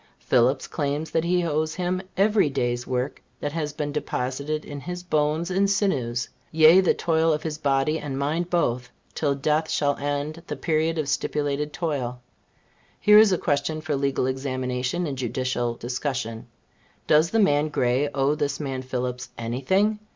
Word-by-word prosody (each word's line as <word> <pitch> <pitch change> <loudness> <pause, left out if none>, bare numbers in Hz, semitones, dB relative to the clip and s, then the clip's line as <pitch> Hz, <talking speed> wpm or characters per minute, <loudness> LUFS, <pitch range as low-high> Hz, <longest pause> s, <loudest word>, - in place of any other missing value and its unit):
Phillips 130 +2 +2
claims 150 +1 -2
that 160 - +1
he 180 0 +2
owes 155 0 -1
him 180 0 -1 0.2
every 205 -4 +3
day's 120 -3 -1
work 130 +2 -2 0.2
that 145 - -3
has 150 -1 -2
been 150 0 -3
deposited 145 +1 -3
in 145 -1 -7
his 180 +4 -6
bones 155 +1 0
and 195 +2 +2
sinews; 130 - 0 0.2
yea, 160 +3 +7
the 185 - +2
toil 165 -1 +2
of 150 0 -1
his 155 -2 -4
body 140 +2 +1
and 135 -2 -4
mind 160 +5 -1
both, 125 -8 0 0.2
till 145 -3 0
death 155 +3 0
shall 145 -1 +1
end 145 +3 -3
the - - -3
period 160 +1 0
of 155 -3 -1
stipulated 145 +1 -1
toil. 140 -7 -3 0.8
Here 210 0 +7
is 215 -2 +6
a 185 - +3
question 145 +1 -1
for 155 -2 -2
legal 140 -1 0
examination 130 +3 -2
and 140 -4 -4
judicial 120 -1 -1
discussion. 120 -2 -4 0.6
Does 155 +2 +4
the 225 - 0
man 155 -7 +3
Gray 130 +1 +1
owe 135 +1 +1
this 145 -2 -2
man 135 -3 -3
Phillips 125 -1 -4
any 120 +2 -3
thing? 205 +9 +2
145 Hz, 165 wpm, -25 LUFS, 130-160 Hz, 0.8 s, yea